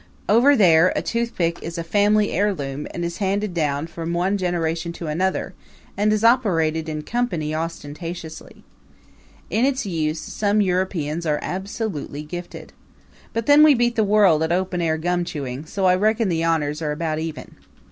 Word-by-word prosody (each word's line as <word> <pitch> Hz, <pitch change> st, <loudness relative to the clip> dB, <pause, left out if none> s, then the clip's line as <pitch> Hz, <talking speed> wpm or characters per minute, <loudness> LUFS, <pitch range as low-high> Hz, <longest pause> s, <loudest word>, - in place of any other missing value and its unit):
Over 245 Hz, +8 st, +5 dB
there, 180 Hz, -5 st, +5 dB
a -, -, 0 dB
toothpick 230 Hz, -8 st, -1 dB
is 170 Hz, +1 st, -6 dB
a 170 Hz, -, -3 dB
family 205 Hz, +4 st, +2 dB
heirloom 150 Hz, -8 st, -1 dB
and 175 Hz, -, -4 dB
is 170 Hz, +1 st, -4 dB
handed 200 Hz, 0 st, -1 dB
down 150 Hz, -3 st, -1 dB
from 165 Hz, 0 st, -5 dB
one 180 Hz, +4 st, +1 dB
generation 170 Hz, -3 st, -1 dB
to 170 Hz, -, -7 dB
another, 180 Hz, +5 st, -1 dB, 0.4 s
and 210 Hz, +1 st, +2 dB
is 215 Hz, 0 st, 0 dB
operated 165 Hz, -10 st, +2 dB
in 155 Hz, -1 st, -4 dB
company 175 Hz, -9 st, -2 dB
ostentatiously. 165 Hz, +1 st, -6 dB, 0.9 s
In 225 Hz, -, +1 dB
its 265 Hz, -2 st, +1 dB
use 160 Hz, -4 st, -1 dB
some 205 Hz, +4 st, -1 dB
Europeans 180 Hz, -4 st, -1 dB
are 150 Hz, -1 st, +1 dB
absolutely 190 Hz, -6 st, -4 dB
gifted. 175 Hz, +3 st, -8 dB, 0.6 s
But 230 Hz, -1 st, -2 dB
then 290 Hz, +1 st, +6 dB
we 305 Hz, -2 st, +7 dB
beat 240 Hz, 0 st, +1 dB
the 220 Hz, -, +3 dB
world 200 Hz, -6 st, +4 dB
at 160 Hz, +1 st, 0 dB
open 180 Hz, 0 st, 0 dB
air 160 Hz, -1 st, +1 dB
gum 175 Hz, +2 st, 0 dB
chewing 145 Hz, -4 st, -6 dB
so 195 Hz, +3 st, -2 dB
I 180 Hz, -, +5 dB
reckon 215 Hz, +3 st, +1 dB
the 165 Hz, -1 st, 0 dB
honors 155 Hz, -2 st, 0 dB
are 150 Hz, -2 st, -1 dB
about 155 Hz, 0 st, -2 dB
even. 160 Hz, -1 st, -6 dB
175 Hz, 165 wpm, -22 LUFS, 160-205 Hz, 0.9 s, we